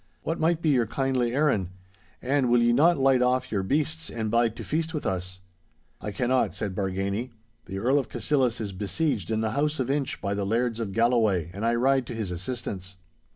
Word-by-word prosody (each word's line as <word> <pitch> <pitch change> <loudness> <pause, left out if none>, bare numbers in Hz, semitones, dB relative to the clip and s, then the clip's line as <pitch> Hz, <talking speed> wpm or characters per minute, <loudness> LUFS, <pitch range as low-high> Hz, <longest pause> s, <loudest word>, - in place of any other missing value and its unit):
What 165 - -2
might 165 +1 +1
be 160 - +3
your 125 -5 +3
kindly 130 -1 0
errand? 135 - +2 0.5
And 135 0 +2
will 120 0 +4
ye 120 0 +4
not 160 +7 +5
light 135 -2 +4
off 125 0 +1
your 100 -3 0
beasts 155 +9 -1
and 110 -2 -3
bide 115 -1 +2
to 115 - -7
feast 160 - -2
with 150 - -4
us.' 90 -1 -3 0.6
'I 105 - -4
cannot,' 130 +2 +1
said 100 -3 -3
Bargany. 100 +4 -2 0.4
'The 95 - -6
Earl 130 +8 +2
of 135 - -4
Cassillis 130 -5 0
is 105 -3 -4
besieged 105 - -1
in 110 0 0
the 110 -1 0
house 150 +4 0
of 130 0 0
Inch 140 -1 -1
by 100 - -2
the 100 0 -2
Lairds 115 +3 0
of 110 -4 -3
Galloway, 110 -7 +2
and 100 +3 -6
I 115 +1 +2
ride 130 +1 +2
to 120 - -5
his 110 -5 -3
assistance. 95 -1 -5
120 Hz, 205 wpm, -26 LUFS, 100-135 Hz, 0.6 s, not